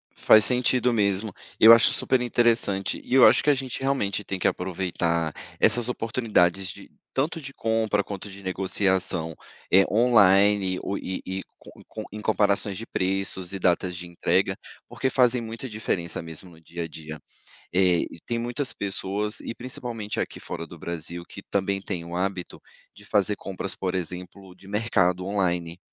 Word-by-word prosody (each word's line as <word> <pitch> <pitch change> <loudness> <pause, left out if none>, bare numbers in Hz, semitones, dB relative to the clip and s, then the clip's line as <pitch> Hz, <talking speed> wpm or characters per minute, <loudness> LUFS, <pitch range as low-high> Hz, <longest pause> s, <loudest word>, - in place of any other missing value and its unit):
Faz 110 -2 +6
sentido 125 -1 +2
mesmo. 100 -1 +1 0.3
Eu 115 +1 +10
acho 115 - +6
super 130 -1 +1
interessante, 115 -5 +1
e 130 - -1
eu 130 - +8
acho - - +6
que 150 - +2
a 145 - +5
gente, 130 -1 -5
realmente, 105 -7 0
tem 95 - -4
que - - +1
aproveitar 85 -3 -1 0.3
essas 120 0 +3
oportunidades 105 -6 +1
de - - -11 0.2
tanto 155 +4 -1
de 135 0 -7
compra, 110 -2 +1
quanto 100 0 -7
de 100 +1 -11
negociação, 95 -3 -1 0.4
eh, 95 - +8
online 100 -4 +4
o 100 - -2
e 95 - -5
e 95 0 -4 0.2
co - - -15
e - - -16
co - - -7
em 105 - -6
comparações 100 -2 +1
de 115 - -6
preços 95 -2 -2
e 100 - -3
datas 90 0 +1
de 90 - -6
entrega, 90 +3 +1 0.3
porque 130 - -1
fazem 125 -2 +3
muita 115 +3 -6
diferença 100 -7 -2
mesmo, 80 +2 -7
no 80 - -17
dia 85 +1 -6
a 80 - -4
dia. 80 -1 -9 0.6
Eh, 90 -2 +3
e - - -11
tem 120 -1 -1
muitas 120 +4 -3
pessoas, 100 +1 -3
e - - -6
principalmente 120 -4 -5
aqui, - - -3
fora 85 - -6
do 85 - -12
Brasil, 85 +1 -4
que 100 - -9
também 100 0 0
têm 90 -4 -5
o 85 +1 -5
hábito 95 -1 -3 0.4
de 105 - -15
fazer 105 -1 +1
compras, 95 -1 -4
por 95 -1 -3
exemplo, 90 +1 -6
de 95 - -17
mercado, 95 -4 +1
online. 90 -4 -1
100 Hz, 175 wpm, -25 LUFS, 90-115 Hz, 0.6 s, Eu